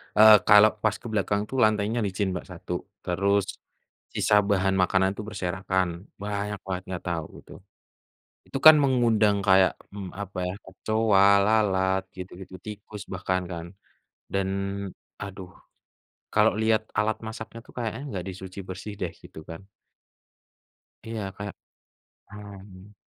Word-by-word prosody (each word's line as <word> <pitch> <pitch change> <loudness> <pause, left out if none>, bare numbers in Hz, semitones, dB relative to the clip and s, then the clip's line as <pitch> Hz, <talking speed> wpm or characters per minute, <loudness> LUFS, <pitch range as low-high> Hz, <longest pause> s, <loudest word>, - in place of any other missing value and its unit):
eee, 110 0 +9
kalau 105 0 +8
pas 110 -1 +2
ke 120 - -10
belakang 100 -1 0
tuh 130 - -4
lantainya 110 0 +2
licin 95 0 -1
Mbak 90 - -5
satu, - - -6 0.2
terus 100 +2 0 0.6
sisa 105 -1 +4
bahan 95 -1 +2
makanan 95 +1 +3
tuh - - -5
berserakan, 95 -2 -2
banyak 105 0 -3
banget 95 -1 -3
nggak 90 -2 -5
tau 85 -3 -2
itu, - - -14 0.9
itu - - -3
kan 155 0 +12
mengundang 115 -6 +3
kayak, 95 -2 +5 0.2
mmm, 95 -3 -7
apa 100 0 -7
ya, 90 - -4
kecoa, 105 +1 +2 0.2
lalat, 95 -3 +2
gitu-gitu, 95 0 -9
tikus 105 0 -9
bahkan 95 0 -1
kan, 85 -1 -6 0.7
dan 95 -1 0 0.7
aduh 95 -2 -8 0.8
kalau - - +4
lihat 110 0 +2
alat 105 +1 +1
masaknya 110 +1 -7
itu - - -16
kayaknya 120 +1 -4
enggak 95 -10 -5
di - - -5
cuci 95 0 -9
bersih 95 +3 -7
deh 90 - -2
gitu 80 - -12
kan. 80 +4 -9 1.4
Iya 115 -1 -4
kayak 100 0 -6 0.8
mmm. 100 -1 -12
100 Hz, 135 wpm, -26 LUFS, 95-105 Hz, 1.4 s, kan